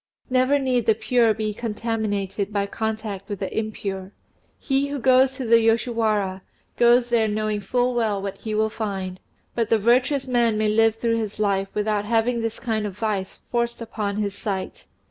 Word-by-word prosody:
Never 255 +2 +3
need 255 -4 0
the 220 - +5
pure 235 0 +3
be 215 -1 -2
contaminated 210 -3 -2
by 200 -1 0
contact 215 -2 -4
with 205 - -3
the 190 0 -5
impure; 200 -3 -4 0.4
he 275 0 0
who 285 0 -3
goes 260 +1 +4
to 260 -1 -5
the 230 0 +6
Yoshiwara, 220 -4 +1 0.3
goes 240 0 +4
there 230 -2 +3
knowing 215 0 -1
full 245 +5 0
well 220 -4 0
what 195 0 -5
he 215 -1 -4
will 220 0 +1
find, 190 -4 -4 0.3
but 230 -2 -1
the 225 - +4
virtuous 255 +5 +2
man 235 -3 +2
may 215 0 +1
live 225 +1 +3
through 230 0 0
his 215 -2 -4
life 200 -2 +1
without 210 -1 0
having 230 +2 +1
this 225 0 -3
kind 220 -3 -1
of 195 -1 -8
vice 205 -4 -3
forced 235 0 -1
upon 215 -3 -3
his 205 -1 -1
sight. 200 -2 -5
220 Hz, 180 wpm, -23 LUFS, 205-235 Hz, 0.4 s, the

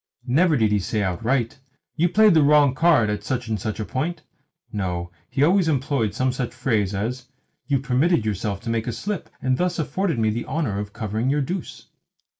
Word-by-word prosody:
Never 155 +5 +3
did 110 -3 +2
he 105 - +3
say 105 +2 -1
outright, 115 +7 -1 0.4
"You 170 +3 +2
played 215 +2 +5
the 160 - +5
wrong 145 -2 +5
card 140 -7 +3
at 105 - -3
such 125 -2 -3
and 110 -2 -1
such 110 +1 -4
a 105 - -2
point." 155 +7 -3 0.5
No, 90 -4 -3 0.2
he 135 +2 +1
always 180 +2 +4
employed 135 -7 0
some 130 +2 +1
such 125 -1 -4
phrase 110 -6 0
as, 125 +6 -3 0.4
"You 140 -1 +2
permitted 135 +1 +1
yourself 100 -1 -2
to 115 - -3
make 115 0 -1
a 120 - -2
slip, 190 - -4
and 130 -1 +1
thus 180 0 0
afforded 170 0 -1
me 110 -1 +2
the 115 +2 -4
honour 130 -12 -1
of 105 0 -5
covering 110 +2 -2
your 145 +1 +1
deuce." 175 +6 -5
125 Hz, 200 wpm, -23 LUFS, 110-150 Hz, 0.5 s, played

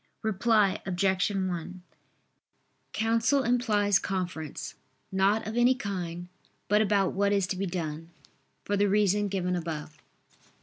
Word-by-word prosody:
Reply 210 -1 +2
Obj. 190 +1 +1
1: 185 -2 -3 1.1
Counsel 230 +5 +2
implies 210 -5 +2
conference, 180 -5 -4 0.4
not 195 +3 +2
of 220 - -5
any 245 +2 +4
kind, 175 -6 -5 0.4
but 210 +1 +4
about 200 -2 +2
what 200 +1 +1
is 200 -2 +2
to 185 - -3
be 195 +1 -2
done, 165 -2 -4 0.6
for 205 - 0
the 205 0 +2
reason 205 0 +2
given 180 -2 -1
above. 155 -3 -5
195 Hz, 125 wpm, -28 LUFS, 180-210 Hz, 1.1 s, any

